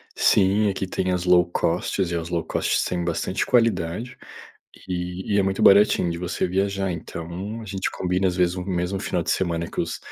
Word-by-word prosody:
Sim, 100 +2 +3
aqui 95 0 -3
tem 95 0 -1
as 90 -1 -1
low-cost 90 +1 +2
e 85 -2 -1
as 85 0 -4
low-cost 85 -2 0
têm 90 -1 -2
bastante 85 +2 -1
qualidade, 115 -2 0 0.7
e 90 +1 -3
e - - +3
é 100 - +4
muito 95 0 -1
baratinho 100 -3 +5
de 85 - -4
você 90 +1 -2
viajar. 95 0 -1
Então, 85 +7 -6
a - - -8
gente 95 -2 -3
combina 90 +1 -1
às 90 - -3
vezes 90 -1 +2
um 90 - -4
mesmo 90 +1 -2
final 90 - -1
de - - -2
semana 85 -2 -1
que - - -3
os - - -3
90 Hz, 190 wpm, -23 LUFS, 85-95 Hz, 0.7 s, baratinho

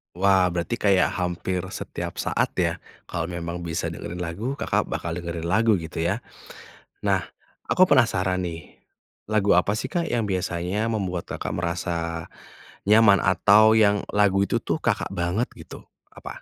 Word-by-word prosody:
Wah, 95 0 +4
berarti 90 +7 -2
kayak 100 -4 +3
hampir 90 0 -2
setiap - - -5
saat - - 0
ya? - - 0 0.3
Kalau 85 - -2
memang 85 0 -5
bisa 80 0 -2
dengerin 90 +1 -6
lagu 100 +10 -3
Kakak 140 - -1
bakal 85 0 -4
dengerin 85 -1 -5
lagu 110 +4 +3
gitu 80 - -8
ya? 100 +7 0 0.8
Nah, - - +2 0.5
aku 185 - +5
penasaran 95 - +2
nih, 85 -2 -6 0.6
lagu 105 -2 +3
apa 100 +4 +2
sih - - -3
Kak 170 +5 -2
yang 115 -2 0
biasanya 95 +2 -1
membuat 95 -6 -3
Kakak - - -4
merasa 85 -1 -3 0.6
nyaman 105 -2 +6
atau 105 +4 +5
yang 105 -2 +4
lagu 100 -1 +3
itu - - +2
tuh - - -1
Kakak 110 -3 0
banget 90 +5 0
gitu, - - -12 0.3
apa? - - -9
95 Hz, 150 wpm, -24 LUFS, 85-110 Hz, 0.8 s, nyaman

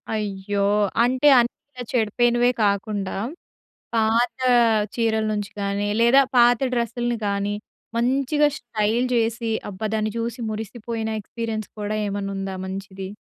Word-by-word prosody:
అయ్యో! 200 -1 -1 0.4
అంటే, 255 +4 +2
అన్నీ 240 0 +1 0.2
ఇలా 250 -1 -6
చెడిపోయినవే 240 +2 +3
కాకుండా, 200 -1 -1 0.8
పాతా 235 +3 +2 0.4
చీరల 220 -2 +1
నుంచి 205 -1 -3
కానీ, 200 +1 -1
లేదా 255 +4 +6
పాత 240 -1 +6 0.2
డ్రస్సుల్ని 240 0 -1
కానీ, 200 +1 -1 0.4
మంచిగా 275 +5 +2
స్టైల్ 230 +1 0
చేసి, 230 0 0 0.2
అబ్బా! 205 +3 -4
దాన్ని 215 -1 -1
చూసి 235 +1 -3
మురిసిపోయిన 220 +1 -4
ఎక్స్‌పీరియన్స్ 220 0 -5
కూడా 210 +1 -2
ఏమన్నుందా 195 -1 -3
మంచిది? 190 0 -6
220 Hz, 115 wpm, -23 LUFS, 205-240 Hz, 0.8 s, లేదా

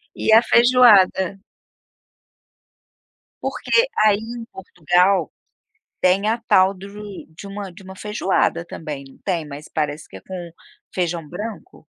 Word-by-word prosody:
E 220 - 0
a 225 - +8
feijoada? 205 -6 +4 2.0
Porque 475 +2 +1
aí 210 -1 +4
em 230 +1 -7
Portugal, 180 -1 +1 0.7
tem 195 +3 +2
a 230 - +1
tal 190 +1 +4
de 190 +1 -11 0.5
de 185 - -10
uma 200 -1 -7
de 180 - -14
uma 190 0 -11
feijoada, 195 -4 0
também, 150 -5 -7
não 135 - -19
tem? 170 -5 -1
Mas 145 +1 -10
parece 150 0 -3
que - - -12
é - - -10
com 180 -2 -8 0.4
feijão 170 -3 -2
branco? 215 - -8
190 Hz, 130 wpm, -21 LUFS, 170-210 Hz, 2.0 s, a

